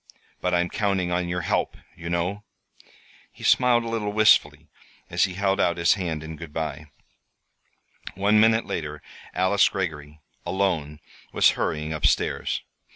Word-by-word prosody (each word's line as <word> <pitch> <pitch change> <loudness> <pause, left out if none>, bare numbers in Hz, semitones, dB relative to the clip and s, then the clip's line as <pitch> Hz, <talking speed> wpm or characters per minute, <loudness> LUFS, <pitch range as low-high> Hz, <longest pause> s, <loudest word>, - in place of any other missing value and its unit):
But 90 0 +1
I'm 85 0 +2
counting 95 -4 0
on 90 0 0
your 90 +1 -2
help, - - -1 0.2
you 85 0 -7
know," 90 +4 -2 0.9
he - - -15
smiled 125 -2 +4
a - - -6
little 110 -3 -2
wistfully, 80 -8 +3 0.4
as - - +3
he 90 - -6
held 100 0 0
out 85 -2 +2
his 85 -1 +4
hand 85 -6 -3
in 80 0 -8
good 85 -2 -9
by. 75 -1 -5 1.3
One 105 +2 +3
minute 110 +1 +4
later 75 -2 -5 0.3
Alice 95 +2 +3
Greggory, 80 -6 -5 0.2
alone, 85 -5 -1 0.3
was - - +5
hurrying 75 +1 -2
up 75 - +1
stairs. - - -1
90 Hz, 150 wpm, -24 LUFS, 80-100 Hz, 1.3 s, was